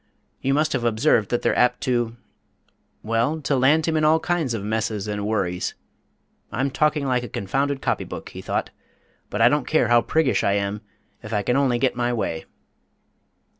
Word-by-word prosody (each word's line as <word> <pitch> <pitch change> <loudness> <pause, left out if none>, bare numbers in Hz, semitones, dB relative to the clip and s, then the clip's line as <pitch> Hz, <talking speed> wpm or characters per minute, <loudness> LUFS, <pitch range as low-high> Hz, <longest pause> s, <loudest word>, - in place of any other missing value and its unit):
You 135 +1 +1
must 155 +1 +1
have 130 -3 -1
observed 115 -2 +2
that 120 - -1
they're - - +2
apt 125 0 +2
to 120 -3 -1 0.9
well, 115 +8 0
to 140 -1 0
land 145 +5 +3
him 160 - 0
in 155 - +1
all 155 +1 +4
kinds 160 -9 -1
of 100 - -4
messes 110 -1 -2
and 105 -1 -3
worries.... 90 -5 -1 0.8
I'm 130 +6 -1
talking 150 0 +1
like 125 -2 +1
a 120 - -7
confounded 135 +9 -2
copybook," - - -3
he - - -9
thought, - - -2 0.6
"but 105 +2 0
I - - +8
don't 145 +1 +1
care 155 -7 +2
how 120 0 +5
priggish 155 +1 +1
I 100 - +2
am 100 +1 -1 0.4
if 110 - -9
I 105 -1 0
can 125 - +1
only 135 -3 +2
get 130 +1 +1
my 120 0 0
way!" 85 -8 -3
120 Hz, 185 wpm, -23 LUFS, 110-140 Hz, 0.9 s, I